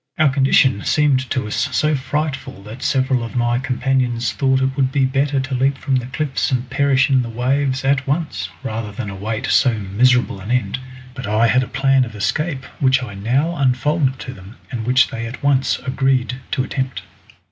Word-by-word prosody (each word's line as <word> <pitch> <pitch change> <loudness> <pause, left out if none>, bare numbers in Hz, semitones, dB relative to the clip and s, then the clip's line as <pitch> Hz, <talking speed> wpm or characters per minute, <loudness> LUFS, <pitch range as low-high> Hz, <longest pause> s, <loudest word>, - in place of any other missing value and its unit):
Our 155 -2 +4
condition 130 -5 +3
seemed 135 -4 +2
to 130 -5 -1
us 105 - -3 0.2
so 155 0 +1
frightful 130 -5 -3
that 110 +5 -10
several 130 -2 +1
of 115 - -7
my 120 0 +1
companions 125 -2 0
thought 130 -1 +2
it 130 0 0
would 130 -2 +1
be 140 -2 +2
better 135 +1 +1
to 130 +1 -4
leap 135 +2 +1
from 135 -1 0
the 125 -1 -3
cliffs 135 +1 -1
and 125 -1 -1
perish 140 -1 +3
in 130 -1 +4
the 120 - -5
waves 130 +3 0
at 135 -1 +1
once, 135 - -2
rather 110 -1 -4
than 105 0 -5
await 110 +5 -4
so 125 -3 +3
miserable 110 +3 +2
an 100 +3 -8
end; 125 +1 0 0.3
but 130 -4 -6
I 110 +2 +3
had 125 +3 +3
a 125 - -3
plan 135 0 +2
of 115 -3 -7
escape 130 +8 -2
which 130 -1 +3
I 115 -5 -7
now 130 +12 0
unfolded 135 0 +1
to 130 - -6
them, 95 0 -13 0.2
and 115 -3 -4
which 130 +1 +4
they 115 0 -5
at 125 +4 -9
once 140 -2 +2
agreed 130 -1 0
to 130 - 0
attempt. 130 -1 -3
130 Hz, 195 wpm, -19 LUFS, 120-135 Hz, 0.3 s, Our